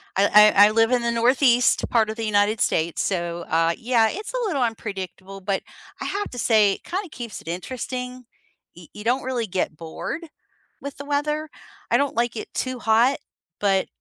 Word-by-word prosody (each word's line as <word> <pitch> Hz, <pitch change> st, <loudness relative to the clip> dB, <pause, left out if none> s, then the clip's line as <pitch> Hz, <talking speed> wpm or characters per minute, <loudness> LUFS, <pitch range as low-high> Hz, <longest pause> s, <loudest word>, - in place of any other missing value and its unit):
I 210 Hz, +2 st, +6 dB
I 205 Hz, +1 st, +8 dB
I -, -, 0 dB
live 225 Hz, +2 st, +3 dB
in 245 Hz, -1 st, +2 dB
the 235 Hz, 0 st, 0 dB
northeast 245 Hz, +1 st, +3 dB
part 220 Hz, -2 st, +2 dB
of 220 Hz, -, -4 dB
the 225 Hz, -1 st, -4 dB
United 205 Hz, +1 st, +2 dB
States, 165 Hz, +1 st, +1 dB
so, 175 Hz, -2 st, -2 dB
uh, 165 Hz, +1 st, +2 dB
yeah, 230 Hz, -2 st, +2 dB
it's 415 Hz, +7 st, -6 dB
a -, -, -1 dB
little 285 Hz, -9 st, -1 dB
unpredictable, 195 Hz, -4 st, -4 dB
but 195 Hz, 0 st, -1 dB, 0.4 s
I -, -, -3 dB
have 410 Hz, +1 st, -3 dB
to 245 Hz, -, -8 dB
say 215 Hz, -4 st, +4 dB
it -, -, -9 dB
kinda 375 Hz, 0 st, -4 dB
keeps 235 Hz, -7 st, -8 dB
it -, -, -20 dB
interesting. 250 Hz, +6 st, -5 dB, 0.5 s
Y 175 Hz, -2 st, -13 dB
You 210 Hz, -, -9 dB
don't 250 Hz, +3 st, +1 dB
really 245 Hz, -4 st, -2 dB
get 180 Hz, -4 st, -2 dB
bored 170 Hz, -, -6 dB, 0.5 s
with 280 Hz, 0 st, -7 dB
the 280 Hz, -, -8 dB
weather. 300 Hz, +1 st, -1 dB, 0.4 s
I -, -, +5 dB
don't 280 Hz, -3 st, 0 dB
like 235 Hz, 0 st, 0 dB
it -, -, -7 dB
too 255 Hz, -1 st, -3 dB
hot, 230 Hz, +5 st, +3 dB, 0.4 s
but 195 Hz, -2 st, +2 dB
225 Hz, 195 wpm, -23 LUFS, 195-255 Hz, 0.5 s, I